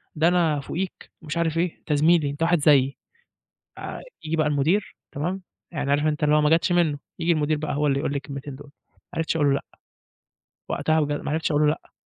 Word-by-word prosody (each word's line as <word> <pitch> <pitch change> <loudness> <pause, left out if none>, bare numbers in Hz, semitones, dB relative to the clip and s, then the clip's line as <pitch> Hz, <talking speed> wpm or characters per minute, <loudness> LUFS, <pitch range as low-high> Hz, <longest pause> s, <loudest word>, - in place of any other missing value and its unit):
ده 160 +2 +3
أنا 170 -4 +2
فُوقيك." 180 +6 -5
ومش 160 0 -5
عارف 165 -1 0
إيه، 170 0 0
أنت 150 - -2
زميلي 155 0 +4
أنت 145 +3 -3
واحد 175 0 +3
زيي 140 -2 +4 0.8
آآ، - - -6 0.2
ييجي 160 +1 -1
بقى 155 -2 +2
المدير، 150 +8 +1 0.2
تمام؟ 175 +7 -3 0.3
يعني 145 -3 -1
عارف 145 +1 +2
أنت 150 -1 -1
اللي 150 0 +4
هو 150 - +4
ما 150 - +3
جتش 170 - -2
منُّه، 165 -5 +2 0.2
ييجي 170 +1 +2
المدير 155 -1 +1
بقى 150 -1 -3
هو 150 +1 +1
اللي 140 -1 +2
يقول 140 - -1
لي 145 - -1
الكلمتين 140 0 -7
دُول، 145 +1 -13 0.2
ما - - -33
عرفتش 165 0 -1
أقول 150 -3 +3
له 140 - +4
لأ، 140 - -1 1.1
وقتها 160 0 +1
بجد 145 0 -1
ما - - -3
عرفتش 160 +1 0
أقول 145 0 +2
له - - +4
لأ. 150 - -4
150 Hz, 225 wpm, -24 LUFS, 145-165 Hz, 1.1 s, زميلي